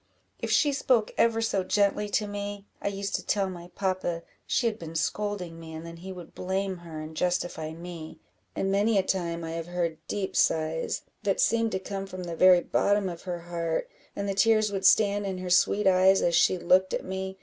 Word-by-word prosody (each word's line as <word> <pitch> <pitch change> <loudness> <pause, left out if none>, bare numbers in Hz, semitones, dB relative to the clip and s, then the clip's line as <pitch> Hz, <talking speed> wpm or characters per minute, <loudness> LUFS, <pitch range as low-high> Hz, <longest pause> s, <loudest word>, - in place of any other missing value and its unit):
If - - -3
she 290 -2 +3
spoke 250 -5 +2
ever 225 -1 +2
so 200 -4 0
gently 205 +2 +1
to 210 +1 +1
me, 205 0 -5 0.2
I - - -2
used 200 0 -3
to - - -8
tell 195 -2 0
my 175 -1 -9
papa 185 -3 -1 0.2
she 245 - +1
had 225 -2 0
been 165 -1 -8
scolding 180 -1 -2
me, 160 -1 -9
and 160 +1 -7
then 170 0 -9
he 190 +3 -8
would 180 -3 -10
blame 190 0 -2
her 165 -2 -9
and 155 +1 -8
justify 175 -2 -1
me; 165 -1 -8 0.4
and 195 - 0
many 205 +2 +3
a 195 - +3
time 170 -3 -2
I 165 - -4
have 165 0 -4
heard 170 -2 -2
deep 195 -2 -3
sighs, 160 0 +1 0.2
that 200 -3 0
seemed 230 0 +2
to 190 - 0
come 195 0 -5
from 185 -1 -7
the 170 -1 -5
very 180 0 +6
bottom 205 +1 +1
of 170 -1 -7
her 175 -1 -3
heart, 170 -1 -3 0.2
and 200 - -3
the 195 - 0
tears 215 +1 +3
would 195 -1 +2
stand 205 -1 +4
in 190 -1 -3
her 185 -1 -5
sweet 200 +3 +3
eyes 190 0 +5
as 170 - +2
she 185 +2 +4
looked 185 +2 +3
at - - -4
me. 190 0 -4
190 Hz, 215 wpm, -27 LUFS, 170-200 Hz, 0.4 s, very